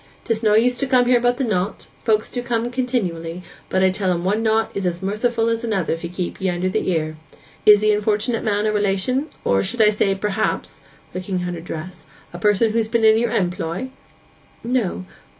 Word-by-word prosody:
'Tis 225 Hz, -1 st, 0 dB
no 210 Hz, -2 st, +3 dB
use 245 Hz, +3 st, +4 dB
to 275 Hz, +2 st, -2 dB
come 255 Hz, -2 st, +4 dB
here 245 Hz, 0 st, +4 dB
about 245 Hz, +1 st, +1 dB
the 270 Hz, -, -1 dB
knot—folks 215 Hz, +1 st, -1 dB
do 245 Hz, -, -4 dB
come 240 Hz, 0 st, -2 dB
continually, 185 Hz, -10 st, -2 dB, 0.3 s
but 190 Hz, 0 st, +1 dB
I 190 Hz, -, +4 dB
tell 190 Hz, 0 st, -1 dB
'em 170 Hz, -1 st, -1 dB
one 205 Hz, +4 st, +1 dB
knot 220 Hz, 0 st, +1 dB
is 200 Hz, -, -3 dB
as 175 Hz, +1 st, -3 dB
merciful 225 Hz, +3 st, 0 dB
as 230 Hz, 0 st, -1 dB
another 200 Hz, -9 st, 0 dB
if 165 Hz, -, -6 dB
ye 170 Hz, -, -4 dB
keep 180 Hz, +1 st, -5 dB
it 190 Hz, -, +1 dB
under 180 Hz, +1 st, -1 dB
the 185 Hz, -, -1 dB
ear. 155 Hz, -3 st, -1 dB, 0.5 s
Is 210 Hz, -1 st, +8 dB
the 215 Hz, 0 st, +4 dB
unfortunate 210 Hz, +2 st, 0 dB
man 210 Hz, 0 st, 0 dB
a 215 Hz, -, +2 dB
relation; 210 Hz, +7 st, 0 dB, 0.2 s
or, 95 Hz, -, +3 dB
I -, -, +2 dB
should 215 Hz, -, +2 dB
say, 195 Hz, -1 st, +1 dB
perhaps' 210 Hz, +2 st, -2 dB, 0.3 s
(looking 185 Hz, 0 st, -3 dB
at 175 Hz, -, -3 dB
her 170 Hz, -, -6 dB
dress) 170 Hz, +2 st, -8 dB, 0.3 s
'a 175 Hz, -, -7 dB
person 210 Hz, +3 st, +3 dB
who's 225 Hz, 0 st, 0 dB
been 225 Hz, 0 st, +1 dB
in 220 Hz, 0 st, +6 dB
your 235 Hz, 0 st, +1 dB
employ?' 180 Hz, +4 st, -2 dB, 0.7 s
'No. 230 Hz, -6 st, -1 dB
210 Hz, 205 wpm, -21 LUFS, 185-230 Hz, 0.7 s, Is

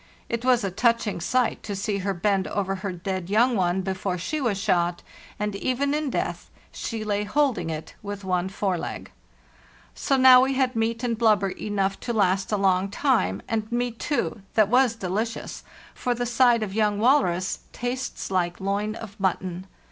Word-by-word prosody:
It 235 Hz, 0 st, -2 dB
was 250 Hz, -3 st, +3 dB
a 195 Hz, -, -1 dB
touching 230 Hz, -2 st, +1 dB
sight 250 Hz, +6 st, +1 dB
to 205 Hz, -, -5 dB
see 200 Hz, +1 st, -2 dB
her 195 Hz, 0 st, -2 dB
bend 195 Hz, +1 st, +1 dB
over 195 Hz, -1 st, -1 dB
her 190 Hz, +1 st, -4 dB
dead 185 Hz, 0 st, -4 dB
young 235 Hz, +4 st, +3 dB
one 185 Hz, -1 st, +1 dB
before 190 Hz, -1 st, -2 dB
she 290 Hz, -, -3 dB
was 230 Hz, -7 st, 0 dB
shot, 175 Hz, -3 st, 0 dB, 0.3 s
and 210 Hz, -1 st, -2 dB
even 265 Hz, +6 st, 0 dB
in 300 Hz, -1 st, -1 dB
death -, -, -3 dB, 0.2 s
she 225 Hz, -2 st, -4 dB
lay 205 Hz, -1 st, 0 dB
holding 220 Hz, -, +1 dB
it 155 Hz, -1 st, -6 dB
with 205 Hz, -1 st, -6 dB
one 185 Hz, 0 st, 0 dB
fore 190 Hz, -2 st, -1 dB
leg. -, -, -6 dB, 0.8 s
So 275 Hz, -, 0 dB
now 255 Hz, -1 st, +8 dB
we 265 Hz, +1 st, +1 dB
had 260 Hz, -2 st, +1 dB
meat 230 Hz, +1 st, -1 dB
and 235 Hz, -2 st, 0 dB
blubber 215 Hz, -4 st, +3 dB
enough 195 Hz, 0 st, -2 dB
to 235 Hz, -, -3 dB
last 195 Hz, -2 st, +1 dB
a 210 Hz, -, +2 dB
long 190 Hz, 0 st, +2 dB
time, 220 Hz, -, +1 dB
and 220 Hz, -1 st, -2 dB
meat, 240 Hz, -1 st, -1 dB
too, 285 Hz, -7 st, -1 dB
that 215 Hz, -2 st, +4 dB
was 250 Hz, -1 st, +4 dB
delicious, 215 Hz, +3 st, -3 dB, 0.3 s
for 245 Hz, -1 st, -1 dB
the 245 Hz, +1 st, -2 dB
side 240 Hz, -1 st, +3 dB
of 195 Hz, -3 st, -5 dB
young 210 Hz, -1 st, +1 dB
walrus 205 Hz, -7 st, +2 dB
tastes 245 Hz, -3 st, -4 dB
like 175 Hz, -2 st, 0 dB
loin 200 Hz, +2 st, -1 dB
of 215 Hz, -2 st, -10 dB
mutton. 185 Hz, -1 st, -2 dB
210 Hz, 180 wpm, -25 LUFS, 190-240 Hz, 0.8 s, now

